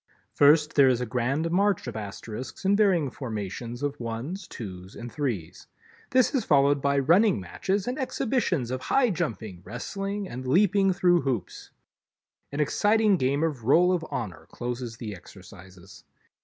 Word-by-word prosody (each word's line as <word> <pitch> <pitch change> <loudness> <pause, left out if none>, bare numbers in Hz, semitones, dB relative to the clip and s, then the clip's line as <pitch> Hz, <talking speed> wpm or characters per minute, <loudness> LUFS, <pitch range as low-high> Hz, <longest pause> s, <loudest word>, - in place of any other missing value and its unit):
First, 150 +1 +5
there 140 -2 +6
is 125 -2 +2
a 125 - -2
grand 130 +8 -1
march 200 +1 +2
of 120 -3 -6
Asterisks 110 - -7
in 200 +1 +4
varying 185 -10 +2
formations 115 +1 -5
of 145 0 -2
ones, 125 - -5
twos 95 -3 -9
and 120 0 -8
threes. 120 - -4 0.4
This 255 +2 +3
is 265 - +1
followed 140 -1 +3
by 140 0 +1
running 175 - +4
matches 190 - -2
and 250 +4 -2
exhibitions 220 - -1
of 130 0 -3
high 250 - +2
jumping, 110 - -4
wrestling 195 - -4
and 130 -2 -7
leaping 195 +5 +3
through 180 -2 +3
hoops. 120 -9 -4 0.8
An 140 - -4
exciting 210 +7 +3
game 140 +1 +1
of 145 -8 -2
Roll 175 +8 +5
of 175 -2 -1
Honor 90 -8 -5
closes 120 -1 -5
the 105 -3 -6
exercises. 95 0 -14
140 Hz, 155 wpm, -26 LUFS, 115-185 Hz, 0.8 s, there